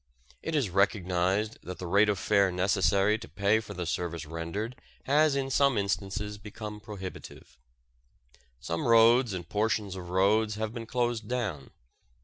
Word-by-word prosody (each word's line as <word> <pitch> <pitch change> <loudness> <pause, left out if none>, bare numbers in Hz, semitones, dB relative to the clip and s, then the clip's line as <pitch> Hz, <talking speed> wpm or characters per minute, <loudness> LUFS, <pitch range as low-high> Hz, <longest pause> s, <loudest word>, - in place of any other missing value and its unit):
It 160 - -3
is 130 -11 +1
recognized 95 +1 +1
that 90 0 -7
the 90 - -6
rate 100 +4 +4
of 105 - +1
fare 100 -1 +2
necessary 95 +3 +2
to - - -10
pay 100 +2 +2
for 110 - -9
the 90 -1 -3
service 85 -1 -3
rendered 85 +9 -4 0.3
has 150 +1 +3
in 135 -1 -1
some 140 -2 +3
instances 100 +1 -2
become 105 0 -8
prohibitive. 100 - -9 1.0
Some 85 - -3
roads 115 +1 +6
and 90 -2 -5
portions 105 -2 -1
of 90 -2 -8
roads 105 +4 +2
have 110 0 -3
been 115 -2 -6
closed 120 -3 -1
down. 110 - -3
105 Hz, 150 wpm, -29 LUFS, 95-110 Hz, 1.0 s, roads